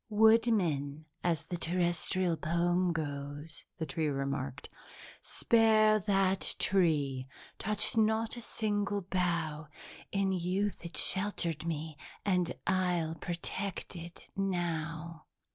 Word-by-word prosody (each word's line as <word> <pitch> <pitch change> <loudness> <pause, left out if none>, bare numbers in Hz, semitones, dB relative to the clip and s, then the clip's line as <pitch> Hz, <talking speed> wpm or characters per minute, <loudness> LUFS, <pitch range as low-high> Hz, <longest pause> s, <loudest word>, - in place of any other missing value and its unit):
"'Woodman,' 205 - +3 0.2
as 170 -4 0
the 175 - -4
Terrestrial 175 0 +1
poem 175 +3 +1
goes," 145 -1 -5
the 160 - -2
tree 155 +2 -1
remarked, 135 -2 -3 0.5
"'spare 220 -2 +4
that 195 -1 +2
tree! 145 -9 +2 0.3
Touch 210 +1 +2
not 220 +1 +2
a 240 - -7
single 205 -3 -1
bough! 170 -4 -1 0.4
In 195 -1 +1
youth 190 +3 -1
it 170 -3 -6
sheltered 175 -5 +2
me 155 -1 -4 0.3
and 180 -4 +2
I'll 180 -4 +1
protect 175 +4 -4
it 170 0 -9
now!'" 170 -4 -3
175 Hz, 105 wpm, -32 LUFS, 160-195 Hz, 0.5 s, spare